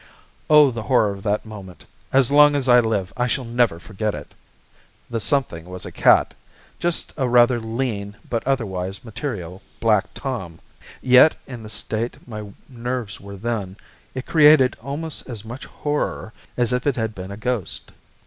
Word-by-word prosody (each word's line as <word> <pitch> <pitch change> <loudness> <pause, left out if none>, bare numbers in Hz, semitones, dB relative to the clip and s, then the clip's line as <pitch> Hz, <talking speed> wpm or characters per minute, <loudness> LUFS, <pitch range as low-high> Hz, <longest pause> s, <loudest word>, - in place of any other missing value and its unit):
Oh, 150 -3 +7
the 115 -1 -5
horror 110 -3 +2
of 100 0 -8
that 105 +2 -1
moment, 100 -4 -11 0.3
as 135 -1 +3
long 145 0 +7
as 135 -2 -1
I 125 -1 +7
live 110 -5 -1
I 125 0 0
shall 125 +1 -1
never 115 -6 +1
forget 105 +4 -3
it. 75 -1 -10 0.8
The 115 - -1
something 105 - 0
was 90 0 -8
a - - -7
cat, - - +4 0.5
just 175 -1 -1
a 130 -4 0
rather 120 0 +5
lean 110 -3 -3
but 115 -2 -1
otherwise 95 -7 -2
material, 105 - -5 0.2
black 105 -1 +3
Tom; 95 -12 -5 0.5
yet, 130 +4 +7
in 125 -3 -8
the 110 - -9
state 110 +2 -3
my 105 -3 -7 0.2
nerves 120 -4 -5
were 100 0 -9
then, 105 -3 -3 0.4
it 130 - -4
created 150 -4 +6
almost 145 +4 -4
as 115 -3 -7
much 120 +4 -8
horror 145 -6 -3 0.2
as 120 0 +1
if 125 +3 -1
it 140 - +2
had 110 -2 -2
been 95 -1 -8
a 100 - -7
ghost. 115 -3 -3
115 Hz, 170 wpm, -22 LUFS, 100-130 Hz, 0.8 s, Oh